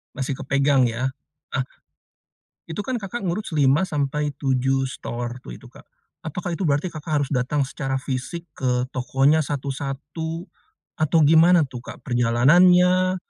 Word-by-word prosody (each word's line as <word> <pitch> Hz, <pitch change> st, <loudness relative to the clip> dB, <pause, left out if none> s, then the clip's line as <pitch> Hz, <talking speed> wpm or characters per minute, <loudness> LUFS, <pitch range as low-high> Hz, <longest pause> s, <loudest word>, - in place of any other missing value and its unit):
Masih 135 Hz, 0 st, -2 dB
kepegang 135 Hz, -2 st, +2 dB
ya? 125 Hz, +3 st, -1 dB, 0.4 s
Ah, 135 Hz, -, 0 dB, 1.1 s
itu 165 Hz, +5 st, -4 dB
kan 260 Hz, -, -2 dB
Kakak 205 Hz, +2 st, -5 dB
ngurus 180 Hz, +2 st, -3 dB
5-7 140 Hz, -3 st, +1 dB
store 120 Hz, 0 st, -5 dB
waktu, -, -, -17 dB
itu -, -, -15 dB
Kak. -, -, -16 dB, 0.4 s
Apakah 175 Hz, +3 st, -4 dB
itu 185 Hz, +3 st, -3 dB
berarti 145 Hz, +5 st, +1 dB
Kakak 155 Hz, -1 st, -1 dB
harus 135 Hz, -, -4 dB
datang 130 Hz, +3 st, 0 dB
secara 135 Hz, -1 st, -3 dB
fisik 135 Hz, +6 st, -4 dB
ke 125 Hz, -2 st, 0 dB
tokonya 135 Hz, +4 st, +2 dB
satu-satu, 145 Hz, +4 st, -4 dB, 0.5 s
atau 155 Hz, +1 st, +2 dB
gimana 165 Hz, +2 st, +6 dB
tuh 130 Hz, -3 st, -8 dB
Kak? -, -, -11 dB
Perjalanannya, 180 Hz, +10 st, +4 dB
145 Hz, 130 wpm, -23 LUFS, 130-165 Hz, 1.1 s, gimana